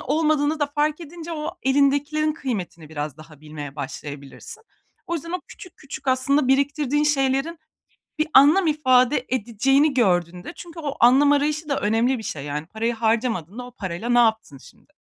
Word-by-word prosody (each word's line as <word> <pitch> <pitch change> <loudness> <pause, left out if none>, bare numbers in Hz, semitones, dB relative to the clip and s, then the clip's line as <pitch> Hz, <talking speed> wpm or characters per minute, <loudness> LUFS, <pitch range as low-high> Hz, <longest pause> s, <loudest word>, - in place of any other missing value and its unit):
olmadığını 305 +1 +1
da 290 - +2
fark 295 +2 -1
edince 335 +1 -8
o 305 0 -5
elindekilerin 285 +3 +2
kıymetini 195 - -5
biraz 150 -2 -5
daha 155 -2 -15
bilmeye 150 -2 -9
başlayabilirsin. 140 - -8 0.4
O 340 - -2
yüzden 335 +1 -5
o 360 - -2
küçük 365 - -13
küçük 275 0 -8
aslında 260 +1 +2
biriktirdiğin 285 +1 +1
şeylerin 275 +3 0 0.6
bir 310 - +1
anlam 310 +7 +6
ifade 260 -3 +3
edeceğini 260 +5 +2
gördüğünde 180 -6 0
çünkü 340 -1 -10
o 285 -3 -4
anlam 270 +5 +5
arayışı 300 +2 0
da 280 - 0
önemli 230 +5 +1
bir 220 - -8
şey 140 -8 -5
yani 150 +2 -4
parayı 230 +4 -2
harcamadığında 225 -2 -1
o 250 - -12
parayla 190 0 -5
ne 240 0 +4
yaptın 220 - +1
şimdi? - - -19
265 Hz, 160 wpm, -23 LUFS, 210-300 Hz, 0.6 s, anlam